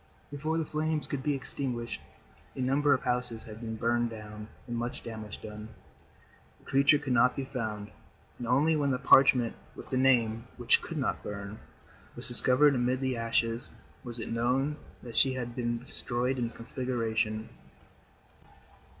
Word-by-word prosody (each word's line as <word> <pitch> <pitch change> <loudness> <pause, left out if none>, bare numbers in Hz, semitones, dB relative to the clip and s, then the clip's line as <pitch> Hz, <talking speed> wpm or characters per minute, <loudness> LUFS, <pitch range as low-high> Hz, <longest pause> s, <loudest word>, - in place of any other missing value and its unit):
Before 155 +3 -2
the 165 - 0
flames 155 0 -1
could 140 - -3
be 145 +1 0
extinguished, 125 -3 -4 0.5
a - - -8
number 140 +3 +2
of 130 - -5
houses 125 -2 -1
had 110 +1 -10
been 110 -1 -4
burned 120 +1 +1
down 105 -1 -9 0.2
and 120 - -4
much 120 +1 -4
damage 110 -3 -7
done. 105 0 -8 0.9
The - - -26
creature 140 +2 +4
could 140 -3 -2
not 125 +1 +4
be 135 - -3
found, 110 -6 -4 0.5
and 120 - -4
only 145 +6 +3
when 145 -2 +1
the 130 - +1
parchment 130 -3 +5 0.2
with - - -10
the 130 - +1
Name, 115 -3 +3
which - - +3
could - - -6
not - - -1
burn, 100 +1 -6 0.6
was - - +1
discovered 140 +3 +5
amid 125 0 +1
the 130 -1 -1
ashes, 115 0 -1 0.3
was 120 -1 -6
it 115 +1 -4
known 130 +5 +1 0.3
that 120 -2 -8
she 135 -2 +6
had 120 -2 -5
been 120 -1 -1
destroyed 125 +1 -2
in 120 - 0
the 115 - -10
conflagration. 115 -3 -2
125 Hz, 165 wpm, -30 LUFS, 115-135 Hz, 0.9 s, she